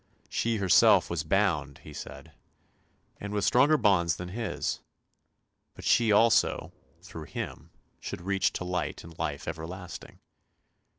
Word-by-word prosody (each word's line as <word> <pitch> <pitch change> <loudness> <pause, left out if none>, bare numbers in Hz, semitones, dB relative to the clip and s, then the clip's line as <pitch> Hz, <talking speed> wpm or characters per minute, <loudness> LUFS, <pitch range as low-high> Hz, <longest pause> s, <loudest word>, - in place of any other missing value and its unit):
She 115 -1 0
herself 95 -3 +5
was 85 -2 -1
bound, 80 -5 0
he 75 - -11
said, - - -9 0.9
and 100 - -6
with 105 -1 0
stronger 145 +5 +5
bonds 95 - +3
than 90 0 -7
his; 115 +3 -3 1.0
but - - -10
she 115 -2 +4
also, 105 -6 +3 0.3
through 80 -4 -9
him, - - -6 0.3
should - - -6
reach 95 +2 +1
to - - -4
light 90 0 -3
and 85 0 -12
life 75 -4 -3
everlasting. 85 +2 -7
90 Hz, 130 wpm, -28 LUFS, 80-105 Hz, 1.0 s, herself